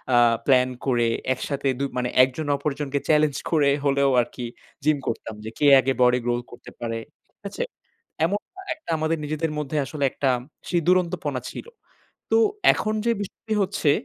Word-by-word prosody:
আ - - +6 0.3
plan 130 -2 +4 0.2
করে 120 -3 +2 0.3
একসাথে 140 +2 -3
দু - - 0
মানে 125 0 0
একজন 130 +4 -2
অপরজনকে 140 0 -2
চেলেঞ্জ 150 -2 +3
করে 150 -4 +4 0.2
হলেও 140 0 +3
আরকি 120 +1 -6 0.4
জিম 155 0 +3
করতাম। 110 -1 -4
যে 110 - -4
কে 150 - +1 0.2
আগে 135 +1 0
বডি 125 0 +5
growth 120 0 -1
করতে 120 - -12
পারে, 115 -1 -3 0.3
ঠিক - - -72
আছে? - - -3 0.6
এমন 200 +5 0 0.4
একটা 315 - -8
আমাদের 160 +1 0
নিজেদের 155 +2 -2
মধ্যে 150 +1 -3
আসলে 145 +2 -4
একটা 135 - 0 0.4
ছি - - -2
দুরন্তপনা 175 -6 +1
ছিল। - - -8 0.7
তো - - +5 0.4
এখন 215 0 -2
যে 235 - +3
বিষয়টি 210 +2 -5
হচ্ছে, 190 -6 +1
140 Hz, 160 wpm, -24 LUFS, 130-160 Hz, 0.7 s, আ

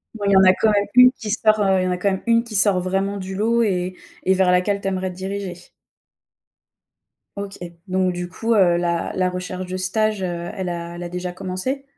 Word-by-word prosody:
Bon, 205 -2 -4
il 200 - +3
y - - +5
en 190 - +7
a 185 0 +7
quand 220 - +2
même 205 -1 +2
1 250 0 +8
qui 225 -4 -8
sort, 215 -1 +2
heu, 190 -2 +3
il - - 0
y - - 0
en - - 0
a 180 - -1
quand 200 +2 +1
même 190 - -3
1 230 0 +4
qui 225 -3 -8
sort 200 -2 +4
vraiment 195 +2 -1
du 190 0 -6
lot 230 +3 +2
et 185 -3 -1 0.3
et 190 - +3
vers 185 -1 +3
laquelle 190 +3 +1
tu 195 - -5
aimerais 185 -1 -2
te 180 - -9
diriger? 190 0 -5 1.8
OK 200 0 -6 0.3
donc 185 0 0
du 175 0 -5
coup, 230 +5 -1
heu, 180 -5 +4
la 170 -1 -1
la 185 -1 +1
recherche 180 0 -5
de 180 +1 -5
stage, 210 +3 0
heu, 175 -2 -4
elle 185 -2 -3
a 170 0 -5
elle 175 - -7
a 175 - -5
déjà 180 0 -4
commencé? 185 +10 -4
190 Hz, 240 wpm, -21 LUFS, 180-205 Hz, 1.8 s, 1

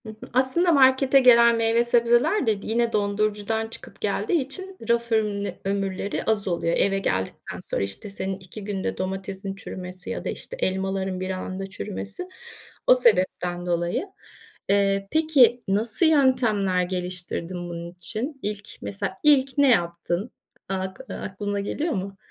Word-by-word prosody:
Hı - - -7
hı. 215 - -9 0.2
Aslında 265 +8 +3
markete 265 -1 +5
gelen 235 -2 +7
meyve 230 +1 +3
sebzeler 240 - +3
de 210 -2 +1
d - - -9
yine 230 +1 +1
dondurucudan 210 +1 0
çıkıp 225 - -12
geldiği 340 -5 0
için 375 +8 -6
raf 235 0 +1
örün 210 -2 0
ömürleri 195 0 -2
az 215 -3 0
oluyor. 170 -2 0
Eve 195 0 +2
geldikten 95 - -3
sonra, - - -3
işte, 100 - -3
senin 195 -1 -4
2 190 +3 -9
günde 195 -2 -3
domatesin 190 +1 -4
çürümesi 185 -2 -7
ya - - -4
da, - - -1
işte, - - -3
elmaların 190 0 -1
bir 185 0 -3
anda 190 +1 -4
çürümesi 205 - -6 0.6
o - - +8
sebepten 180 - +1
dolayı. 175 - -1 0.6
Eee, 195 0 +2
peki 280 -7 +4
nasıl 215 - +2
yöntemler 245 - +3
geliştirdin 180 -1 -3
bunun 170 0 -6
için? 220 - -2
İlk 205 0 -4
mesela 100 - -4
ilk 275 -2 +4
ne 285 -1 +5
yaptın 175 0 0 0.4
ak 190 0 -3
aklına 205 +1 -4
geliyor 295 +11 -2
mu? 195 -1 -4
205 Hz, 145 wpm, -24 LUFS, 190-240 Hz, 0.6 s, o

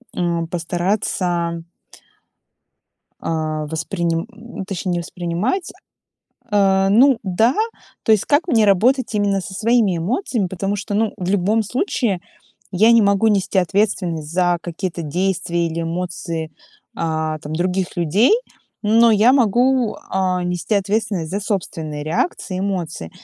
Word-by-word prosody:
м, 170 -1 -1
постараться 175 -1 -1 1.6
а, 155 -1 -2
восприним 165 +2 -2 0.4
точнее, 190 -2 -3
не 175 - 0
воспринимать. 175 - -2 0.8
Э, 195 -2 +3
ну 250 +4 +5
да, 220 +6 +2 0.5
то 220 - +4
есть 210 - +3
как 295 +3 +2
мне 225 -8 +4
работать 235 +6 +3
именно 200 -2 +1
со 185 +1 -8
своими 220 -2 +2
эмоциями, 225 - -1
потому 195 +3 -2
что, 205 +1 -4
ну, 220 +1 +1
в 180 - -4
любом 205 +3 +2
случае 235 - -1 0.5
я 215 +5 +5
не 230 -1 +6
могу 200 +1 +3
нести 200 -2 +1
ответственность 180 -4 0
за 175 -1 +2
какие-то 175 0 -4
действия 175 +1 -1
или 165 0 -3
эмоции, 165 -1 -4 0.4
а, 155 -1 -1
там, 150 - -7
других 180 +2 -1
людей, 175 - +3 0.5
но 230 +2 +5
я 220 +3 +5
могу, 250 -1 +2
а, 185 -1 0
нести 180 +4 -1
ответственность 200 -4 -1
за 200 +2 -2
собственные 160 -7 -3
реакции 185 - -2
и - - -2
эмоции. 175 - -3
190 Hz, 130 wpm, -20 LUFS, 170-215 Hz, 1.6 s, не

